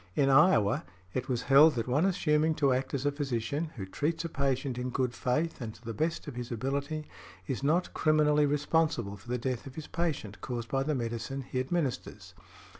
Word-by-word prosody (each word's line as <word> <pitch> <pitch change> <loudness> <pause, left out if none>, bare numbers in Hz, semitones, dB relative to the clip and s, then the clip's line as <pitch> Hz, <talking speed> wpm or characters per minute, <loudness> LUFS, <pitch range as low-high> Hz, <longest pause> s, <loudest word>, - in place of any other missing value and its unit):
In 135 -1 +3
Iowa, 135 - +5 0.3
it 130 +1 -3
was 125 -1 0
held 145 +2 +7
that 115 -1 -2
one 145 +8 +2
assuming 160 -4 +2
to 140 -4 +3
act 130 +2 -1
as 135 0 -3
a 145 - +3
physician, 140 +1 -2
who 100 -6 -5
treats 160 - -2
a - - -3
patient 135 -3 -1
in 125 +1 -2
good 125 -1 -1
faith 150 +6 -1
and 110 -2 -5
to 120 - -18
the 115 - -4
best 160 +9 -1
of 145 - -5
his 120 +1 -6
ability, 140 +6 -2 0.4
is 135 -2 -3
not 160 +6 +1
criminally 150 -1 +3
responsible 145 -7 +1
for 100 +4 -15
the 125 - 0
death 125 +1 -3
of 135 - -10
his 155 - -6
patient, 145 - -3
caused 120 -2 -4
by 135 - +1
the 150 +2 0
medicine 120 +3 -3
he 130 0 -3
administers. 135 0 -3
135 Hz, 200 wpm, -30 LUFS, 125-150 Hz, 0.4 s, held